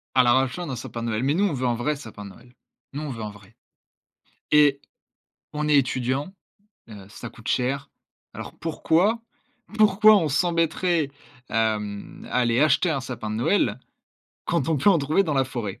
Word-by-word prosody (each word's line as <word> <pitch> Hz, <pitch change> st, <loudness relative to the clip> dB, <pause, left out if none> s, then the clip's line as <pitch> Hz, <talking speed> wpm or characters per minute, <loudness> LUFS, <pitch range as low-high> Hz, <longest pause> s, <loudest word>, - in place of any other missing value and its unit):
À 130 Hz, -, +6 dB
la 120 Hz, -1 st, +4 dB
recherche 135 Hz, +7 st, 0 dB
d'un 135 Hz, -, -4 dB
sapin 115 Hz, -1 st, -6 dB
de 115 Hz, -, -2 dB
Noël. 110 Hz, +2 st, -1 dB
Mais 140 Hz, +2 st, +2 dB
nous, 195 Hz, +5 st, +2 dB
on 170 Hz, -, -2 dB
veut 130 Hz, -1 st, -1 dB
un 120 Hz, -, +1 dB
vrai 145 Hz, +6 st, -1 dB
sapin 110 Hz, -6 st, -10 dB
de -, -, -8 dB
Noël. 125 Hz, +5 st, -18 dB, 0.4 s
Nous, 145 Hz, -, -4 dB
on 150 Hz, -, -5 dB
veut 115 Hz, -4 st, -6 dB
un 105 Hz, -, -4 dB
vrai. 100 Hz, +1 st, -18 dB, 1.0 s
Et 145 Hz, -2 st, +5 dB, 0.7 s
on 150 Hz, 0 st, -2 dB
est 150 Hz, -, +5 dB
étudiant, 130 Hz, +5 st, 0 dB, 0.6 s
heu, 100 Hz, -3 st, -11 dB
ça 120 Hz, +3 st, -8 dB
coûte 110 Hz, -, -13 dB
cher. 135 Hz, +2 st, -1 dB, 0.4 s
Alors -, -, -8 dB
pourquoi, 175 Hz, +7 st, +1 dB, 0.6 s
pourquoi 215 Hz, 0 st, +6 dB
on 165 Hz, -6 st, 0 dB
s'embêterait, 165 Hz, 0 st, +1 dB, 0.4 s
hem, 105 Hz, -2 st, -2 dB
à -, -, -4 dB
aller 120 Hz, -1 st, +2 dB
acheter 155 Hz, +3 st, +3 dB
un 140 Hz, -4 st, -1 dB
sapin 120 Hz, -4 st, -6 dB
de 110 Hz, -, -3 dB
Noël 120 Hz, -, +1 dB, 0.7 s
quand 135 Hz, -, 0 dB
on 160 Hz, -, +2 dB
peut 145 Hz, +9 st, +4 dB
en 180 Hz, -, +4 dB
trouver 150 Hz, +6 st, +2 dB
dans 155 Hz, -6 st, -2 dB
la 135 Hz, -1 st, +3 dB
forêt? 115 Hz, -7 st, -5 dB
135 Hz, 190 wpm, -24 LUFS, 115-160 Hz, 1.0 s, À